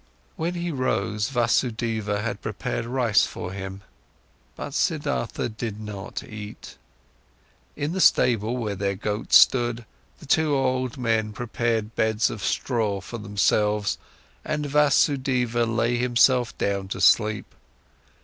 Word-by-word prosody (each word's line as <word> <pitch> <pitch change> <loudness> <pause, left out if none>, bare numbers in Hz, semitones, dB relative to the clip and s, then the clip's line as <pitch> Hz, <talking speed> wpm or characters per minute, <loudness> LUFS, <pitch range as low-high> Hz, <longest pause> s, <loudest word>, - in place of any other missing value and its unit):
When 170 +2 -2
he 175 0 -2
rose, 105 -5 -1
Vasudeva 115 -4 0
had 120 +2 -3
prepared 110 +2 -3
rice 120 -3 +3
for 90 - -6
him. 95 0 -6 0.7
But - - -6
Siddhartha 60 - -1
did 110 -1 -5
not 105 -2 -6
eat. 105 -1 -9 1.0
In 145 +2 -2
the 190 - -1
stable, 115 -4 +3
where 110 -4 -2
their 100 0 -1
goat 105 +3 -4
stood, 120 -2 +5 0.3
the - - -14
two 150 0 +2
old 130 -1 0
men 110 -3 0
prepared 115 -1 -2
beds 110 0 +1
of 105 - -7
straw 110 -6 0
for 115 +4 -8
themselves, 105 0 +1 0.4
and 150 -1 -2
Vasudeva 135 -5 +2
lay 115 +1 +1
himself 125 0 +3
down 100 -1 -1
to 95 - -5
sleep. 110 -2 +3
115 Hz, 125 wpm, -24 LUFS, 105-125 Hz, 1.0 s, stood